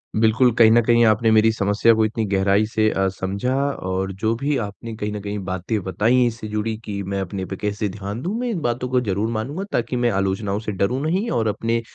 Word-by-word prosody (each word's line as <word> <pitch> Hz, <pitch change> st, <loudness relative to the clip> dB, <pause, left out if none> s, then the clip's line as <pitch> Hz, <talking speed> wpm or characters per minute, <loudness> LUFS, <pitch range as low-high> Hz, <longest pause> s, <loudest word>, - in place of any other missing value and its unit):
बिल्कुल। 110 Hz, +3 st, +4 dB
कहीं 110 Hz, -1 st, +7 dB
न 120 Hz, +1 st, +6 dB
कहीं 120 Hz, +1 st, +4 dB
आपने 110 Hz, +1 st, +3 dB
मेरी 110 Hz, 0 st, +5 dB
समस्या 105 Hz, +2 st, +3 dB
को 110 Hz, 0 st, +2 dB
इतनी 110 Hz, +1 st, -2 dB
गहराई 100 Hz, +1 st, +2 dB
से 110 Hz, 0 st, +1 dB
अ, 95 Hz, -2 st, 0 dB
समझा। 100 Hz, +6 st, -3 dB, 0.4 s
और 95 Hz, +1 st, -1 dB
जो 110 Hz, 0 st, +2 dB
भी 140 Hz, +4 st, -1 dB
आपने 110 Hz, +1 st, -6 dB
कहीं 105 Hz, -1 st, -3 dB
न 105 Hz, -, -4 dB
कहीं 105 Hz, +1 st, -4 dB
बातें 95 Hz, +4 st, -2 dB
बताईं 110 Hz, +8 st, +2 dB
इससे 115 Hz, -2 st, -5 dB
जुड़ीं 110 Hz, +1 st, -2 dB
कि 100 Hz, -1 st, -4 dB
मैं 100 Hz, +1 st, -3 dB
अपने 95 Hz, 0 st, -4 dB
पे 95 Hz, -, -6 dB
कैसे 105 Hz, +1 st, -2 dB
ध्यान 100 Hz, +3 st, -6 dB
दूँ, 190 Hz, +8 st, -3 dB
मैं 245 Hz, 0 st, -2 dB
इन 185 Hz, -8 st, -2 dB
बातों 120 Hz, 0 st, -2 dB
को 125 Hz, 0 st, +2 dB
ज़रूर 105 Hz, -1 st, -1 dB
मानूँगा 130 Hz, -, -3 dB
ताकि -, -, -1 dB
मैं 120 Hz, -1 st, +2 dB
आलोचनाओं 100 Hz, +1 st, -1 dB
से 110 Hz, -1 st, -4 dB
डरूँ 100 Hz, +7 st, -1 dB
नहीं 185 Hz, +9 st, 0 dB
और 110 Hz, -2 st, 0 dB
अपने 115 Hz, +2 st, -1 dB
110 Hz, 225 wpm, -22 LUFS, 100-120 Hz, 0.4 s, कहीं